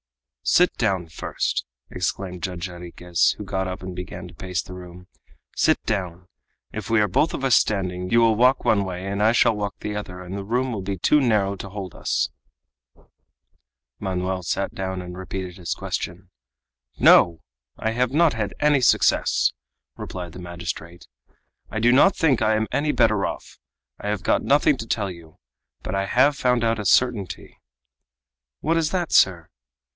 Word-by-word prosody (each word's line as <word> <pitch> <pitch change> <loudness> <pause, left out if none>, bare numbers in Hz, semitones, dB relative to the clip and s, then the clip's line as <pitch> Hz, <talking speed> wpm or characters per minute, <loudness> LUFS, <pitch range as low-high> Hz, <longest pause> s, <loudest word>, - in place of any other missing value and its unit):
"Sit 180 +1 +4
down 95 -7 0
first," 80 - -2 0.3
exclaimed 90 0 -3
Judge 90 -1 -4
Jarriquez, 90 -1 -1
who - - -6
got 95 -1 -2
up 95 0 -6
and 95 -1 -6
began 90 0 -7
to 85 - -14
pace 95 0 -3
the 90 - -10
room. 90 0 -11 0.5
"Sit - - +2
down. 90 -4 -3 0.5
If 110 -1 -6
we 115 -1 +3
are 105 - +3
both 150 - +1
of - - -6
us 130 -3 +4
standing, 90 -3 0
you 115 - +4
will 115 -1 +5
walk 125 +4 +3
one 100 -2 +3
way 90 -1 -5
and 100 +1 -2
I 110 +2 +5
shall 115 -1 +3
walk 100 -1 -3
the 105 0 -4
other, 90 -3 -6
and 90 +1 -7
the 100 - -4
room 125 +5 -1
will 105 - -3
be 95 +1 -4
too 150 - +3
narrow 105 -6 +2
to 100 - -7
hold 95 -3 -7
us." - - -1 1.7
Manoel 95 -1 -2
sat 95 +3 -2
down 95 -1 -4
and 90 0 -8
repeated 95 0 -6
his 85 -3 -3
question. 90 +2 -5 0.7
"No! 85 -2 +5 0.3
I 110 - -1
have 125 +2 0
not 160 +2 +4
had 105 -3 -3
any 145 -2 +3
success!" - - +3 0.4
replied 90 -2 -7
the - - -9
magistrate; 85 -1 -7 0.6
"I 110 - -3
do 120 +2 +4
not 145 +10 +5
think 145 -8 +2
I 110 0 +3
am 110 0 0
any 150 +1 +1
better 110 -7 +2
off. - - -8 0.4
I 105 - -4
have 105 -3 -2
got - - +2
nothing 145 +1 +3
to 115 - -7
tell 100 -4 -1
you; 85 -3 -14 0.5
but - - -4
I 95 0 -1
have 135 +7 +4
found 125 -3 +1
out 115 -1 +1
a 105 - -4
certainty." 105 -2 +1 1.0
"What 165 - 0
is 160 -2 +1
that, 175 -1 -2
sir?" 85 -4 +4
100 Hz, 180 wpm, -23 LUFS, 90-115 Hz, 1.7 s, will